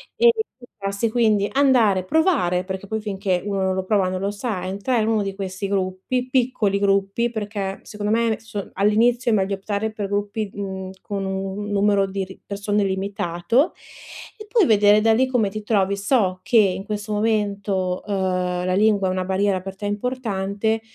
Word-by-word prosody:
E 475 0 +6 0.3
buttarsi, 205 -3 -3
quindi 215 -4 +2
andare, 245 -9 +3
provare, 260 - +2
perché, 190 +1 -6
poi 220 +1 -2
finché 195 -3 -1
uno 200 -1 -1
non 190 0 +1
lo 190 - -1
prova 195 -1 +2
non 185 0 -3
lo 200 +1 -1
sa, 205 -3 -3
entrare 200 +5 0
in 215 - -1
uno 220 -2 +2
di 195 -1 -3
questi 195 0 -4
gruppi, 195 +6 -2
piccoli 240 -6 +1
gruppi; 200 +3 +1
perché 205 -3 -4
secondo 210 0 -4
me 230 +1 +2
adesso 220 -2 -4
all'inizio 235 +5 +2
è - - +3
meglio 195 0 0
optare 205 +2 -3
per 210 -2 -4
gruppi, 205 +1 -2
mhmm, 190 -2 -5
con 200 -2 -4
un, 195 +2 -3
numero 200 -1 +3
di 195 0 -3
r - - -8
di 190 - -13
persone 205 +1 -1
limitato, 195 - 0 0.6
e 425 0 -10
poi 435 -2 +3
vedere 210 -2 +5
da 225 +1 +4
lì 260 +4 +3
come 240 -6 +1
ti 215 +1 -5
trovi. 200 -2 +1
So 200 -4 +1
che 230 +3 +2
in 195 -2 +3
questo 210 0 -4
momento, 200 -4 0
uhm, 185 -2 -1
la 185 - 0
lingua 200 -1 +3
è - - 0
una 185 0 -2
barriera 190 0 +1
per 195 0 -7
te 205 +1 -7
importante, 210 -1 -1
200 Hz, 185 wpm, -22 LUFS, 190-220 Hz, 0.6 s, E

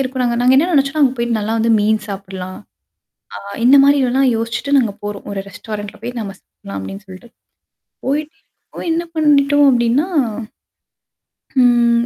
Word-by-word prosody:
இருக்கோம். 260 -1 -2
நாங்க 235 -1 0
நாங்க 255 +1 +4
என்ன 320 +6 +3
நினைச்சோன்னா 295 +1 +2
அங்கே 260 -2 +3
போயிட்டு 235 -1 0
நல்லா 215 +1 -2
வந்து 230 +1 +1
மீன் 215 +1 +2
சாப்பிடலாம். 190 -2 -7 0.8
அ - - -5 0.3
இந்த 275 +3 +7
மாதிரி 285 +1 +5
எல்லாம் 265 +1 +2
யோசிச்சுட்டு, 230 +5 -1
நாங்க 225 -6 -1
போறோம். 205 -1 -6
ஒரு 200 - -4
ரெஸ்டாரண்ட்டில 205 +1 -8
போய் 245 +1 -5
நம்ம 200 -3 -5
சாப்பிடலாம் 100 0 -11
அப்படின்னு 195 - -8
சொல்லிட்டு. 190 +5 -12 0.8
போய், 290 +3 0 0.5
போய் 335 - -4
என்ன 335 +1 -1
பண்ணிட்டோம் 290 -2 +4
அப்படின்னா, 245 +5 +2 1.6
ம் 235 -1 +3
240 Hz, 155 wpm, -17 LUFS, 210-275 Hz, 1.6 s, இந்த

